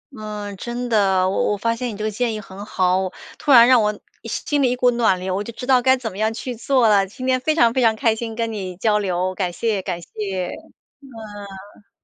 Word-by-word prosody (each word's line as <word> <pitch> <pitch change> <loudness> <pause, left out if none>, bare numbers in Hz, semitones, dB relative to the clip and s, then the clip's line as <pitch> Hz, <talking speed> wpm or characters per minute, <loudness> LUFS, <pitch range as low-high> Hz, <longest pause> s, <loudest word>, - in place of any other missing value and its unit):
嗯， 210 -2 -6
真 240 +3 -5
的， 195 -4 +3
我 190 - 0
我 - - -3
发 230 +3 0
现 245 +1 -3
你 210 - -7
这 215 - -5
个 215 - -1
建 230 +1 -1
议 - - -4
很 195 -1 -10
好， 185 0 +1 0.3
突 295 - 0
然 240 -2 +9
让 255 -2 +6
我 210 -1 -1 0.3
心 280 +5 -1
里 255 - +3
一 250 - 0
股 250 0 +3
暖 230 -6 +2
流， 185 0 -3
我 200 - -2
就 235 - -7
知 250 - -7
道 255 -1 +4
该 260 +1 +4
怎 230 -4 -5
么 190 - -9
样 220 +1 +1
去 245 +3 -5
做 245 0 +2
了。 200 -2 +4
今 255 +6 -8
天 255 0 +2
非 310 +4 0
常 235 -7 +4
非 260 - +1
常 225 -2 +4
开 220 0 +1
心 225 0 -5
跟 230 -1 -2
你 190 -4 -5
交 210 +2 +2
流， 185 -1 -1
感 185 -2 -2
谢 210 +2 -1
感 180 -2 -4
谢。 190 0 -4 0.5
嗯。 205 -5 -11
215 Hz, 260 characters per minute, -21 LUFS, 195-240 Hz, 0.5 s, 然